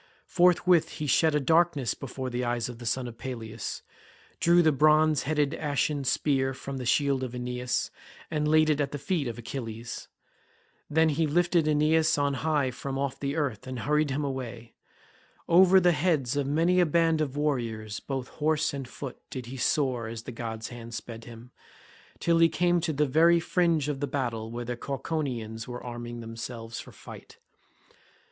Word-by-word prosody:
Forthwith 180 Hz, -1 st, +3 dB
he 150 Hz, -, -4 dB
shed 155 Hz, +3 st, +3 dB
a -, -, +3 dB
darkness 160 Hz, -3 st, +2 dB
before 130 Hz, -1 st, -6 dB
the 125 Hz, +1 st, -2 dB
eyes 120 Hz, -1 st, -1 dB
of 120 Hz, -1 st, -9 dB
the 120 Hz, -, -6 dB
son 125 Hz, +2 st, -1 dB
of 115 Hz, -1 st, -10 dB
Peleus, 115 Hz, -4 st, -6 dB, 0.6 s
drew 170 Hz, +1 st, +5 dB
the 160 Hz, -, +5 dB
bronze 155 Hz, +1 st, +4 dB
headed 150 Hz, -1 st, +1 dB
ashen 145 Hz, -2 st, -1 dB
spear 135 Hz, 0 st, +1 dB
from 135 Hz, +1 st, -6 dB
the 125 Hz, -2 st, -4 dB
shield 140 Hz, 0 st, +2 dB
of 125 Hz, -1 st, -4 dB
Aeneas, 125 Hz, 0 st, -2 dB, 0.4 s
and 150 Hz, -1 st, 0 dB
laid 155 Hz, 0 st, +4 dB
it 150 Hz, -1 st, +1 dB
at 140 Hz, -, -2 dB
the -, -, -2 dB
feet 150 Hz, -1 st, -1 dB
of 120 Hz, -, -5 dB
Achilles. 115 Hz, -1 st, -6 dB, 0.8 s
Then 160 Hz, +1 st, +3 dB
he 155 Hz, +1 st, +1 dB
lifted 170 Hz, +1 st, +2 dB
Aeneas 155 Hz, +1 st, +3 dB
on 140 Hz, -1 st, +1 dB
high 145 Hz, -1 st, 0 dB
from 135 Hz, +2 st, -5 dB
off 135 Hz, -1 st, -2 dB
the 140 Hz, +1 st, -2 dB
earth 140 Hz, -8 st, -2 dB
and 130 Hz, -2 st, -5 dB
hurried 150 Hz, +5 st, +1 dB
him 140 Hz, +2 st, -1 dB
away. 120 Hz, -4 st, -5 dB, 0.7 s
Over 185 Hz, +2 st, +7 dB
the 180 Hz, -1 st, +4 dB
heads 150 Hz, -5 st, +1 dB
of 145 Hz, -1 st, 0 dB
many 165 Hz, +5 st, +2 dB
a 175 Hz, -, +4 dB
band 165 Hz, 0 st, +2 dB
of 145 Hz, -2 st, -2 dB
warriors 115 Hz, -8 st, -2 dB
both 135 Hz, -2 st, -4 dB
horse 155 Hz, 0 st, 0 dB
and 135 Hz, -2 st, -5 dB
foot 130 Hz, +1 st, -8 dB
did 130 Hz, -2 st, -6 dB
he 125 Hz, +3 st, -8 dB
soar 130 Hz, -3 st, 0 dB
as 115 Hz, 0 st, -6 dB
the 125 Hz, -, -7 dB
god's 115 Hz, -1 st, -5 dB
hand 115 Hz, -1 st, -8 dB
sped 115 Hz, 0 st, -8 dB
him, 120 Hz, +1 st, -12 dB, 0.7 s
till 170 Hz, -1 st, +2 dB
he 165 Hz, 0 st, +6 dB
came 175 Hz, 0 st, +2 dB
to 160 Hz, -, -1 dB
the 150 Hz, 0 st, +1 dB
very 165 Hz, +5 st, +5 dB
fringe 165 Hz, -3 st, +1 dB
of 145 Hz, -2 st, -2 dB
the 145 Hz, -, -1 dB
battle 115 Hz, -6 st, -3 dB
where 120 Hz, +1 st, -5 dB
the 120 Hz, +1 st, -3 dB
Cauconians 125 Hz, -5 st, -4 dB
were 125 Hz, 0 st, -7 dB
arming 120 Hz, -1 st, -6 dB
themselves 115 Hz, 0 st, -7 dB
for -, -, -10 dB
fight. -, -, -12 dB
140 Hz, 180 wpm, -28 LUFS, 120-155 Hz, 0.8 s, Over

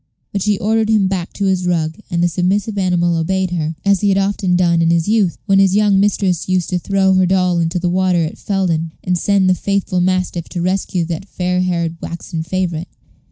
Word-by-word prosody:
But 200 Hz, -, -2 dB
she 210 Hz, +1 st, +1 dB
ordered 220 Hz, +2 st, 0 dB
him 210 Hz, -3 st, +3 dB
back 185 Hz, -2 st, -3 dB
to 200 Hz, -, -2 dB
his 185 Hz, -2 st, 0 dB
rug, 160 Hz, -1 st, -1 dB
and 170 Hz, 0 st, 0 dB
the -, -, +4 dB
submissive 190 Hz, +5 st, -1 dB
animal 175 Hz, -3 st, +1 dB
obeyed 185 Hz, +3 st, -1 dB
her, 160 Hz, -2 st, -2 dB
as 200 Hz, -2 st, +3 dB
he 205 Hz, -, +2 dB
had 195 Hz, -, +2 dB
often 195 Hz, -2 st, 0 dB
done 170 Hz, -2 st, +2 dB
in 165 Hz, -, +2 dB
his 170 Hz, 0 st, +1 dB
youth, 210 Hz, -5 st, +1 dB
when 195 Hz, -2 st, +3 dB
his 195 Hz, -1 st, +3 dB
young 205 Hz, -2 st, +3 dB
mistress 195 Hz, -3 st, 0 dB
used 185 Hz, -1 st, 0 dB
to 180 Hz, -, 0 dB
throw 190 Hz, +1 st, +1 dB
her 185 Hz, -1 st, +3 dB
doll 180 Hz, -2 st, +2 dB
into 165 Hz, +2 st, -1 dB
the 180 Hz, 0 st, -1 dB
water 180 Hz, -1 st, +1 dB
at 155 Hz, -, -7 dB
Felden, 170 Hz, -5 st, -1 dB
and 180 Hz, -, 0 dB
send 195 Hz, +1 st, +2 dB
the 185 Hz, -, +4 dB
faithful 195 Hz, 0 st, -1 dB
mastiff 185 Hz, -2 st, -1 dB
to 175 Hz, -, -4 dB
rescue 185 Hz, -1 st, -1 dB
that 170 Hz, +4 st, -6 dB
fair 180 Hz, 0 st, -1 dB
haired 170 Hz, -2 st, -1 dB
waxen 170 Hz, 0 st, -5 dB
favorite. 170 Hz, 0 st, -3 dB
185 Hz, 215 wpm, -17 LUFS, 170-195 Hz, -, the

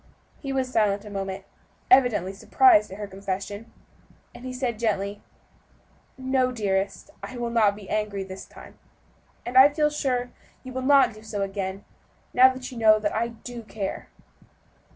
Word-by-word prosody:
He 275 Hz, -, -5 dB
was 265 Hz, -1 st, 0 dB
silent 205 Hz, -1 st, +1 dB
a 210 Hz, -, -9 dB
moment, 195 Hz, -1 st, -4 dB, 0.5 s
evidently 245 Hz, -8 st, +4 dB
surprised 210 Hz, +1 st, +4 dB
at 190 Hz, -, -8 dB
her 210 Hz, -, -5 dB
confession; 200 Hz, +2 st, -6 dB, 0.6 s
then -, -, -12 dB
he 255 Hz, 0 st, -6 dB
said 250 Hz, -3 st, -3 dB
gently, 205 Hz, -3 st, -1 dB, 1.0 s
"No, 260 Hz, -1 st, +1 dB
dearest, 200 Hz, +2 st, -2 dB
I 255 Hz, -, -8 dB
will 235 Hz, -1 st, -3 dB
not 215 Hz, -4 st, +3 dB
be 205 Hz, -2 st, -12 dB
angry 210 Hz, -2 st, -2 dB
this 190 Hz, 0 st, -9 dB
time, -, -, -15 dB, 0.7 s
and 245 Hz, -, -6 dB
I 265 Hz, +2 st, +9 dB
feel 300 Hz, 0 st, +1 dB
sure 250 Hz, -4 st, -1 dB, 0.3 s
you 255 Hz, -1 st, -9 dB
will 260 Hz, -, -3 dB
not 275 Hz, -2 st, +5 dB
do 215 Hz, -, -14 dB
so 210 Hz, -2 st, -4 dB
again, 195 Hz, 0 st, -4 dB, 0.5 s
now 255 Hz, +1 st, +7 dB
you 250 Hz, -1 st, -8 dB
know 215 Hz, -1 st, +6 dB
that 210 Hz, -1 st, -2 dB
I 230 Hz, +2 st, 0 dB
do 235 Hz, +1 st, -9 dB
care." 210 Hz, -3 st, -5 dB
220 Hz, 160 wpm, -25 LUFS, 200-255 Hz, 1.0 s, I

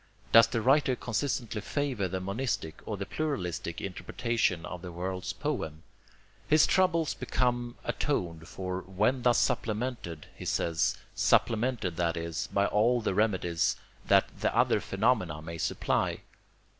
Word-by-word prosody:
Does 115 Hz, 0 st, +8 dB
the 115 Hz, 0 st, -1 dB
writer 135 Hz, 0 st, +4 dB
consistently 115 Hz, -2 st, -2 dB
favor 130 Hz, -4 st, -1 dB
the 95 Hz, +1 st, -3 dB
monistic, 100 Hz, -4 st, -3 dB
or 105 Hz, -, -3 dB
the 100 Hz, -, -4 dB
pluralistic, 90 Hz, -, -3 dB
interpretation 100 Hz, -2 st, -1 dB
of 90 Hz, -1 st, -7 dB
the 90 Hz, -1 st, -7 dB
world's 90 Hz, +2 st, -3 dB
poem? 80 Hz, 0 st, -3 dB, 0.6 s
His 155 Hz, +1 st, +6 dB
troubles 170 Hz, -5 st, +2 dB
become 120 Hz, -1 st, -1 dB
atoned 85 Hz, -, -2 dB
for 90 Hz, 0 st, -4 dB
WHEN 105 Hz, +8 st, 0 dB
THUS 120 Hz, -1 st, +4 dB
SUPPLEMENTED, 110 Hz, -8 st, -1 dB
he -, -, -8 dB
says, 80 Hz, -2 st, +1 dB, 0.2 s
supplemented, 115 Hz, -6 st, +2 dB
that 85 Hz, -1 st, 0 dB
is, 85 Hz, -1 st, -3 dB
by 100 Hz, 0 st, +2 dB
all 115 Hz, +4 st, +3 dB
the 105 Hz, -, 0 dB
remedies 95 Hz, -5 st, +1 dB, 0.3 s
that -, -, +5 dB
THE -, -, +1 dB
OTHER -, -, +4 dB
PHENOMENA 95 Hz, -7 st, +1 dB
may 80 Hz, 0 st, -7 dB
supply. -, -, 0 dB
105 Hz, 135 wpm, -29 LUFS, 90-125 Hz, 0.6 s, Does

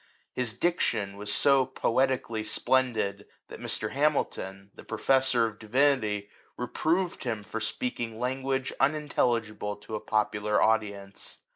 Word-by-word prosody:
His 125 Hz, -3 st, -2 dB
diction 110 Hz, -, 0 dB
was 105 Hz, 0 st, -4 dB
so 135 Hz, +4 st, +5 dB
poetically 130 Hz, -3 st, 0 dB
splendid, 110 Hz, -5 st, 0 dB, 0.2 s
that -, -, -9 dB
Mr. 110 Hz, -, -2 dB
Hamilton, 100 Hz, -9 st, -1 dB
the -, -, -12 dB
professor 130 Hz, +1 st, +2 dB
of 110 Hz, -2 st, -5 dB
divinity, 110 Hz, -4 st, +1 dB, 0.3 s
reproved 165 Hz, +8 st, 0 dB
him 115 Hz, -5 st, -2 dB
for 115 Hz, -, -4 dB
speaking 115 Hz, -, -3 dB
language 130 Hz, +1 st, -1 dB
unintelligible 120 Hz, -8 st, +1 dB
to 105 Hz, +2 st, -12 dB
a 110 Hz, -, -1 dB
popular 105 Hz, -1 st, +1 dB
audi 110 Hz, -2 st, +3 dB
ence. 100 Hz, 0 st, -8 dB
115 Hz, 125 wpm, -28 LUFS, 105-135 Hz, 0.3 s, so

